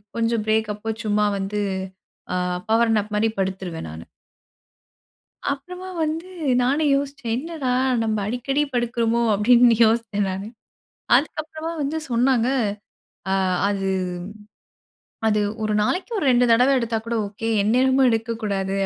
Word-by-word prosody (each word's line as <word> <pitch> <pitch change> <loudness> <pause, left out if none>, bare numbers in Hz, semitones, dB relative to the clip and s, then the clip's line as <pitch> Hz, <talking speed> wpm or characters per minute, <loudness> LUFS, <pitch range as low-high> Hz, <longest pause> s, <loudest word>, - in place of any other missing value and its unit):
கொஞ்சம் 230 -1 0
பிரேக் 220 -1 +1
அப்போ 210 +2 -4
சும்மா 210 0 +1
வந்து 195 +2 -2 0.7
அ - - 0 0.3
பவர் 225 0 +3
நாப் 210 0 -1
மாதிரி 220 +2 +2
படுத்துருவேன் 190 - -3
நானு. 80 +1 -8 1.5
அப்புறமா 360 +7 -6 0.2
வந்து 320 +3 -3 0.4
நானும் 285 +4 +2
யோசிச்சேன். 275 -4 -3
என்னடா 300 -1 -3 0.3
"நம்ம 220 -1 0
அடிக்கடி 250 +6 -1
படுக்கறோமோ 235 -1 +1
அப்படின்னு 235 +3 +5
யோசிச்சேன் 220 -3 0
நானு." 195 +2 -5 0.7
அதுக்கப்புறமா 310 +2 -2
வந்து 290 +3 -1
சொன்னாங்க. 240 0 +2 0.8
அ - - +2 0.4
அது 195 -1 -1 1.4
அது 210 -1 +2 0.2
ஒரு 215 - 0
நாளைக்கு 365 - -1
ஒரு 375 - -1
2 245 0 +4
தடவ 250 +4 +5
எடுத்தா 230 -1 -1
கூட 235 - -2
ஓகே, 215 +3 -6
எந்நேரமும் 260 +5 +3
எடுக்கக்கூடாது 220 -4 -2
230 Hz, 120 wpm, -22 LUFS, 210-270 Hz, 1.5 s, அப்படின்னு